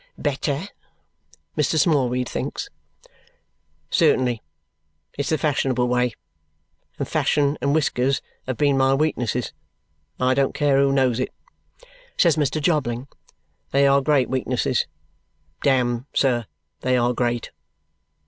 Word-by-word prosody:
"Better," 145 0 -1 0.9
Mr. 150 +1 +1
Smallweed 130 -5 +2
thinks. - - -4 1.2
"Certainly. 125 -3 +2 0.7
It's 140 - -2
the 155 - +2
fashionable 130 -4 +1
way; 125 -1 +1 0.8
and - - -3
fashion 145 0 +1
and 140 +1 +1
whiskers 135 -3 +1 0.3
have 130 -2 -2
been 140 -1 +2
my 135 0 +4
weaknesses, 125 -5 -1 0.7
and 130 - +1
I 130 - +4
don't 135 0 +1
care 145 -2 +3
who 140 0 +3
knows 130 -3 +2
it," 130 - -1 0.9
says - - +4
Mr. 155 0 0
Jobling. 140 -5 0 0.6
"They 140 +1 +3
are 140 0 +4
great 135 -2 +2
weaknesses 130 -1 0 0.7
Damme, 125 -2 +1
sir, 120 -5 +2 0.3
they 130 0 +1
are 120 0 +2
great. 120 -1 -1
135 Hz, 120 wpm, -23 LUFS, 125-140 Hz, 1.2 s, my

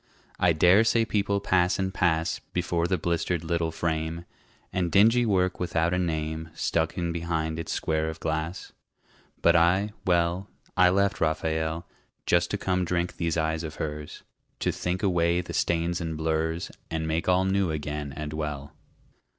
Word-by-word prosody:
I 90 - +4
dare 90 +6 +5
say 115 0 +3
people 100 -1 0
pass 90 -2 +2
and 95 0 -2
pass 80 -3 +1
Before 85 -1 0
the 95 0 +1
blistered 85 0 -1
little 85 0 0
frame, 80 +1 -2 0.5
And 90 -2 0
dingy 115 +4 +5
work 95 -2 +1
without 85 -1 0
a 90 - +1
name 80 -2 -2
Stuck 80 +1 0
in 85 -1 -1
behind 80 -1 -2
its 85 - -4
square 80 0 0
of 80 0 -7
glass. 80 +3 -3 0.7
But - - +5
I, 90 +5 +3
well, 85 +2 +1 0.3
I 90 0 +6
left 100 +2 +1
Raphael 80 +1 -1 0.4
Just 85 0 +2
to 100 - -1
come 90 -2 0
drink 90 0 -1
these 85 -1 -1
eyes 80 0 0
of 80 -2 -6
hers, 75 -1 -5 0.4
To - - +1
think 90 +3 -3
away 85 -2 +2
the 90 - -5
stains 85 +1 0
and 80 -2 -3
blurs 80 +1 -1 0.2
And 80 -1 -2
make 80 +3 0
all 90 +1 +3
new 95 -1 +1
again 75 -2 -3
and 75 +1 -5
well. 75 -2 -4
85 Hz, 165 wpm, -27 LUFS, 80-90 Hz, 0.7 s, I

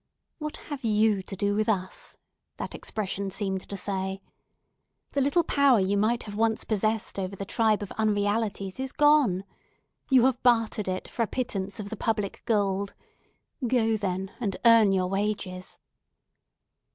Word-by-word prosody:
"What 305 -1 -4
have 285 -3 -7
you 215 -2 +3
to 195 - -7
do 200 +1 0
with 215 +1 +1
us?" 185 -3 -3 0.4
that - - -5
expression 200 -2 -3
seemed 190 -1 -3
to 200 - -4
say. 190 0 -3 0.9
"The 280 - 0
little 285 +6 +3
power 280 -6 +4
you 195 +1 +1
might 220 +4 +1
have 205 - -8
once 220 +1 +1
possessed 215 -1 -1
over 190 0 -3
the 195 - -5
tribe 215 -1 +2
of 200 - -7
unrealities 205 -1 0
is 265 0 -3
gone! 295 -11 +4 0.7
You 255 -2 +6
have 260 -2 +1
bartered 225 -4 +2
it 185 0 -3
for - - -4
a 230 - +2
pittance 200 -6 -3
of 205 -1 -6
the - - -3
public 210 -2 -2
gold. 200 -3 0 0.7
Go 225 -2 +2
then, 190 -2 -2
and 205 -6 -2
earn 230 -3 +7
your 185 -1 +2
wages!" 195 -1 -3
210 Hz, 155 wpm, -27 LUFS, 195-230 Hz, 0.9 s, earn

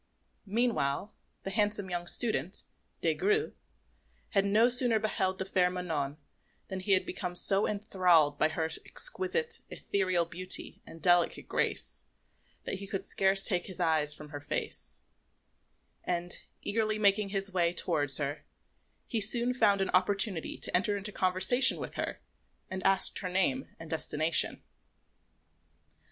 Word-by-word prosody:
Meanwhile 205 - -1 0.3
the 195 - -5
handsome 205 -1 -1
young 175 0 -4
student, 215 -5 0 0.4
Des - - +2
Grieux, 425 +2 0 0.8
had 200 -2 +1
no 215 +4 +4
sooner 245 -2 +6
beheld 190 -3 -1
the 190 - -4
fair 185 -2 +1
Manon 160 -6 -4 0.5
than 190 - -4
he 195 +1 +1
had 185 - +2
become 180 -2 -5
so 195 +3 +2
enthralled 180 -8 +2
by - - +3
her 160 0 -2 0.2
exquisite, 465 +1 +1
ethereal 185 -3 -1
beauty 180 +2 -3
and 165 - -13
delicate 175 -1 +2
grace, - - -2 0.6
that 190 - -4
he 200 - -7
could 195 -1 -4
scarce 195 0 +3
take 180 -4 0
his 185 -2 -8
eyes 160 -3 +2
from 150 0 -11
her 145 -1 -7
face; 145 - -5 1.0
and 175 0 -3 0.2
eagerly 215 0 -1
making 200 -1 +2
his 195 -1 0
way 170 -2 +2
towards 150 -6 +1
her, 145 0 -4 0.6
he 230 -3 -2
soon 240 +4 +5
found 205 -5 +2
an 190 - -1
opportunity 190 -1 0
to - - -2
enter 205 +3 +1
into 200 +1 -4
conversation 190 +8 +3
with - - -7
her, - - -4 0.5
and 190 0 -5
asked 195 0 +3
her 185 - -4
name 225 +9 0
and 165 -1 -10
destination. 160 0 +1
190 Hz, 140 wpm, -30 LUFS, 175-210 Hz, 1.0 s, sooner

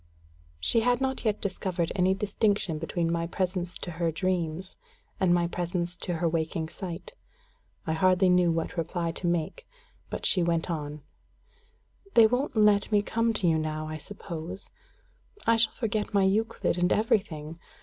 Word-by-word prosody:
She 230 - +3
had 245 +1 +2
not 265 -2 -2
yet 210 -1 +1
discovered 185 -3 -2
any 190 0 +2
distinction 200 -4 0
between 165 +1 -1
my 170 0 -1
presence 180 0 -1
to 175 - -5
her 165 0 -1
dreams 180 +1 -2 0.4
and 185 -2 +3
my 175 0 +3
presence 175 0 -2
to 175 - -3
her 170 +1 0
waking 160 0 -1
sight. 180 - -7 0.7
I 160 - 0
hardly 185 +3 +4
knew 180 -1 +4
what 165 +2 -2
reply 170 0 -1
to 175 - -3
make; 175 - -2 0.4
but - - -4
she 185 - +4
went 170 0 0
on: 150 -2 -5 1.1
"They 230 - +9
won't 250 +5 0
let 210 -1 +4
me 205 -1 +3
come 230 +2 +1
to 200 -4 +1
you 160 -1 +3
now, 155 0 -3
I 155 0 -5
suppose. 170 +1 -7 0.7
I 230 - +5
shall 230 0 +3
forget 215 -3 -2
my 200 - +5
Euclid 195 -2 +1
and 180 +1 +2
everything. 170 -7 0
180 Hz, 160 wpm, -28 LUFS, 165-205 Hz, 1.1 s, They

